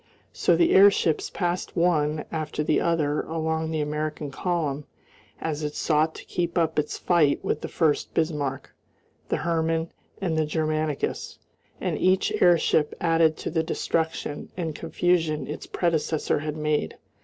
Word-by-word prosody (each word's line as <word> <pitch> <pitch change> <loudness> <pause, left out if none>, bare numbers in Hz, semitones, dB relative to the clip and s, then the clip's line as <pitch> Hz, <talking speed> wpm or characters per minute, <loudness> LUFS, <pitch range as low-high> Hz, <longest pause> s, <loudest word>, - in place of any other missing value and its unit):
So - - +3
the 340 -1 +3
airships 190 -5 +5
passed 175 -1 -2
one 155 -3 +2
after 155 -1 -2
the 155 - +2
other 150 -3 +1
along 160 0 -2
the 160 -1 -1
American 150 0 -3
column 150 -4 -2 0.5
as 155 -1 -3
it 150 -1 -3
sought 155 0 +1
to - - -10
keep 170 -1 -2
up 160 -2 +2
its 150 - -2
fight 165 -5 +2
with - - -1
the - - -4
Furst 155 -3 0
Bismarck, 150 -4 -1 0.6
the - - +1
Hermann, 165 0 0 0.3
and 175 -4 -1
the 160 -1 +2
Germanicus, 155 -1 -2 0.4
and - - -2
each 185 +1 +3
airship 165 -3 +4
added 165 -2 +3
to - - -4
the 160 0 +1
destruction 160 -2 -2
and 165 -3 -2
confusion 165 0 0
its 150 - -7
predecessor 160 -4 0
had 155 0 -4
made. 150 -1 -1
160 Hz, 145 wpm, -25 LUFS, 150-170 Hz, 0.6 s, airships